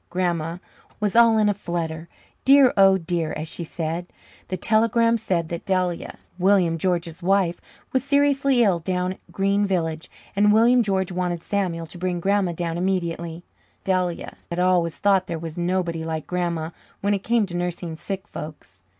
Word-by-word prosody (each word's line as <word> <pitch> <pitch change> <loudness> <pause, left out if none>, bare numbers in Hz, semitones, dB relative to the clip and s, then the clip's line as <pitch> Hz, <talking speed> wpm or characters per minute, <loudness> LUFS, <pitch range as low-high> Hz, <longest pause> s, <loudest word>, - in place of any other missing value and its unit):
Grandma 170 -2 -1 0.4
was 210 -1 -1
"all 230 -1 +6
in 215 -1 +3
a 205 - +3
flutter, 170 -4 -4 0.3
dear, 275 -1 +6
oh 195 -1 +6
dear," 165 -2 -2
as 155 +1 -5
she 170 +1 -5
said. 165 +2 -4 0.4
The 185 - -3
telegram 230 +3 +3
said 180 -7 -1
that 170 -1 -5
Delia, 185 -2 -1 0.2
William 180 -3 +3
George's 175 -1 -1
wife, 185 -1 +1 0.3
was 260 -2 +2
seriously 275 -2 +3
ill 190 -6 +2
down 180 +2 -1
at - - -21
Green 200 +1 +1
Village, 165 -5 -1 0.3
and 210 +1 +4
William 235 +3 +5
George 190 -4 0
wanted 175 -2 -2
Samuel 180 -5 -2
to 175 +2 -12
bring 180 -1 -1
Grandma 195 -1 +1
down 170 0 -3
immediately. 170 -2 -2 0.4
Delia 180 -2 -1
had 170 - -4
always 180 -2 +2
thought 195 -2 +2
there 170 - -3
was 160 -1 -7
nobody 175 -2 -1
like 160 -1 -4
Grandma 170 -3 -2 0.3
when 200 +1 +1
it 200 - 0
came 230 0 +2
to 180 -2 -7
nursing 175 -1 -3
sick 195 +4 -6
folks. 150 - -9
180 Hz, 165 wpm, -23 LUFS, 170-200 Hz, 0.4 s, all